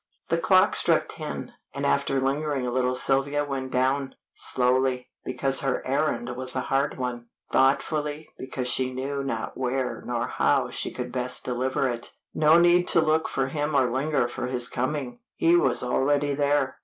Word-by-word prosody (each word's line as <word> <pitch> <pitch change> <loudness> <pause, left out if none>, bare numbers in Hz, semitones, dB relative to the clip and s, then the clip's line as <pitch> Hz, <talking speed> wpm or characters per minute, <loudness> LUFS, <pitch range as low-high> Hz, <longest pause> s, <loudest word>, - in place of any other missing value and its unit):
The - - +2
clock - - +4
struck - - +3
ten, - - -6 0.2
and - - -2
after 135 - +1
lingering 140 0 -1
a 125 - -2
little 125 0 0
Sylvia 140 +3 +1
went 135 -2 -4
down. 130 +2 0 0.2
Slowly, 125 0 0
because 135 +1 +1
her 135 -2 -2
errand 135 -2 -1
was 130 0 +3
a 130 - 0
hard 135 +2 -1
one; 125 -2 -4 0.2
thoughtfully, 150 +3 +1
because 130 -1 -4
she 130 0 -1
knew 140 +2 -3
not 115 -5 -4
where 130 0 -2
nor 120 -1 -2
how - - +1
she - - -2
could 125 -1 -6
best 125 0 0
deliver 130 +2 -1
it. 120 -1 -5 0.2
No 155 +1 +5
need 175 +1 +4
to - - +4
look 160 0 +2
for 135 0 -1
him 150 +1 -2
or 130 -3 +3
linger 135 0 0
for 120 0 -5
his 125 -1 0
coming; 130 -1 -3 0.2
he 170 +1 +3
was 130 -9 +2
already 145 +3 +1
there. 145 -1 0
135 Hz, 170 wpm, -25 LUFS, 125-145 Hz, 0.2 s, No